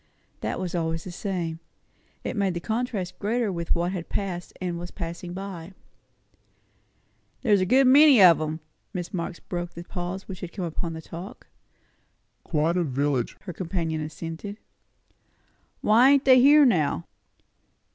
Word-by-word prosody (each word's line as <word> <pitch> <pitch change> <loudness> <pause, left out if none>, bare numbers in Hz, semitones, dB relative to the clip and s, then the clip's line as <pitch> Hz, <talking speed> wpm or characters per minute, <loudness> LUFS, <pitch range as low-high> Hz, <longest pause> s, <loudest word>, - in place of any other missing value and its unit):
That 110 +7 -3
was 185 -2 -4
always 165 -2 -1
the 185 - -7
same. 175 -3 -3 0.6
It - - -3
made 195 -4 0
the - - -1
contrast 220 -2 -3
greater 225 +1 0
with 170 -2 -1
what 175 +1 0
had 180 -3 -5
passed 180 -3 -3
and 175 -2 -3
was 175 0 -6
passing 175 0 -6
away. 190 -2 -7 1.7
"There - - +1
was 200 -2 +5
a 185 - +1
good 265 +6 +5
many 275 0 +7
of 175 -4 +7
'em." 155 +1 -3 0.3
Mrs. 175 -1 -4
Marx' 170 -1 -3
voice - - -27
broke 175 -1 -4
the 170 - -7
pause 180 +2 -5
which 185 -2 -7
had 175 -2 -7
come 185 -4 -3
upon 165 0 -4
the 160 0 -8
talk. 180 +9 -9 1.0
"Quite 165 +2 0
a 180 - +2
village," 140 -3 -1
her 180 - -7
companion 165 -3 -2
assented. 165 +6 -6 1.2
"Why 235 +5 +6
ain't 280 -1 +4
they 260 -1 +7
here 290 +2 +7
now?" 155 - +1
175 Hz, 160 wpm, -26 LUFS, 165-200 Hz, 1.7 s, many